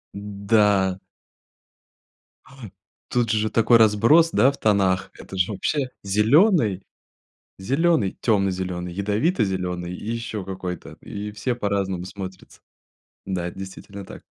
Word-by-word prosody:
Н-да. 100 -1 +1 1.5
Ай! 135 - -15 0.5
Тут 120 -3 0
же 110 0 +1
такой 115 +1 +4
разброс, 115 +10 +5
да, 125 +7 +5
в - - -11
тонах. 95 -3 +1
Это 95 - -9
же 95 +3 +1
вообще 130 +7 -1
зелёный, 110 - +3 0.8
зелёный, 135 - +1
тёмно-зелёный, 95 -4 -1
ядовито-зелёный 95 - -1
и 105 - -9
ещё 115 -4 -4
какой-то, 90 -4 -6
и 105 -1 -6
все 120 +4 -2
по-разному 100 -5 -2
смотрятся. 95 -1 -9 0.7
Да, 90 -2 -2
это 90 - -9
действительно 95 +1 -9
так. - - -11
100 Hz, 115 wpm, -23 LUFS, 95-115 Hz, 1.5 s, разброс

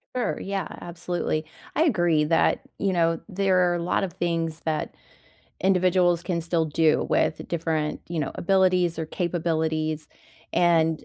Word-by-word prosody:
Sure, 250 - -1
yeah, 195 0 -3
absolutely, 175 -2 -3 0.3
I 315 - +4
agree 175 - +3
that, 165 +1 +2 0.2
you 195 -2 +1
know, 165 -1 +2
there 185 -3 +2
are - - 0
a 170 - -2
lot 180 - 0
of 180 -4 -3
things 165 -3 -2
that 155 -1 -2 0.7
individuals 180 -2 +3
can 175 -3 -1
still 165 0 0
do 155 0 +2
with - - +1
different, 160 -2 -1
you 170 -2 -2
know, 145 - -2
abilities 180 -2 +2
or 160 - -3
capabilities, 160 -3 -1 0.5
and 165 -2 +2
170 Hz, 145 wpm, -25 LUFS, 160-180 Hz, 0.7 s, I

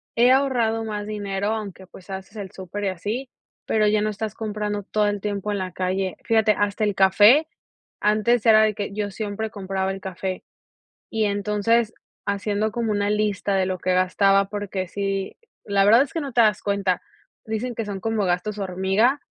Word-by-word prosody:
he 240 +2 +5
ahorrado 240 -5 +2
más 210 -1 -4
dinero 200 -2 -3
aunque, 200 -4 -6
pues, 185 +1 -15
haces 190 +2 -7
el 195 -2 -6
súper 195 +2 -6
y - - +1
así, 210 +9 -4 0.4
pero 215 -1 +2
ya 210 0 +2
no 215 - 0
estás 215 0 -4
comprando 210 -2 -3
todo 210 +1 0
el 205 0 -1
tiempo 205 0 -2
en 205 - -1
la 185 -1 -4
calle. 185 0 -1
Fíjate, 220 -1 +4
hasta 205 +1 0
el 205 - 0
café 205 +10 +6 0.6
antes 215 +2 +2
era 220 -1 +7
de 215 -1 +2
que 200 -1 -4
yo 205 -1 -3
siempre 215 +1 -4
compraba 190 -2 -2
el 195 - -5
café 185 0 -4 0.7
y 220 -1 0
entonces 210 +3 +1 0.3
haciendo 205 +1 -1
como 230 -1 -1
una 205 0 0
lista 210 -1 0
de 190 - +2
lo 185 -1 -2
que 185 +1 0
gastaba, 195 +2 +3
porque, 200 -2 -4
sí, 195 0 -3 0.3
la 200 -1 +2
verdad 225 +5 +7
es 275 - -5
que 330 - -2
no 280 -3 -5
te 235 - +3
das 210 -3 +2
cuenta, 200 -2 0 0.5
dicen 220 +3 -3
que 225 - -2
son 195 -2 -5
como 225 -1 0
gastos 180 +4 -1
hormiga, 195 +8 +1
205 Hz, 190 wpm, -23 LUFS, 195-220 Hz, 0.7 s, era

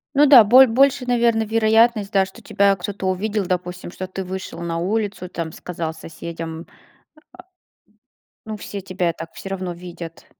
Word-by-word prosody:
Ну 290 +2 +6
да, 270 -5 +9
боль 255 +5 +7
больше, 260 +2 +3
наверно, 235 -2 +2
вероятность, 220 -1 +2
да, 195 -1 +3
что 190 - -14
тебя 200 0 +2
кто-то 195 +1 -5
увидел, 205 +2 -1
допустим, 180 0 -4
что 185 0 -6
ты 190 +1 -6
вышел 185 -2 -6
на 170 -1 -3
улицу, 200 +1 -2
там, 165 -2 -5
сказал 165 -2 -5
соседям, 165 0 -8
а, - - -26 1.7
ну 220 0 -5
все 200 -1 -7
тебя 185 -2 -2
так 165 0 -9
всё 195 - -8
равно 185 -2 -4
видят. 170 -1 -10
190 Hz, 160 wpm, -21 LUFS, 175-220 Hz, 1.7 s, да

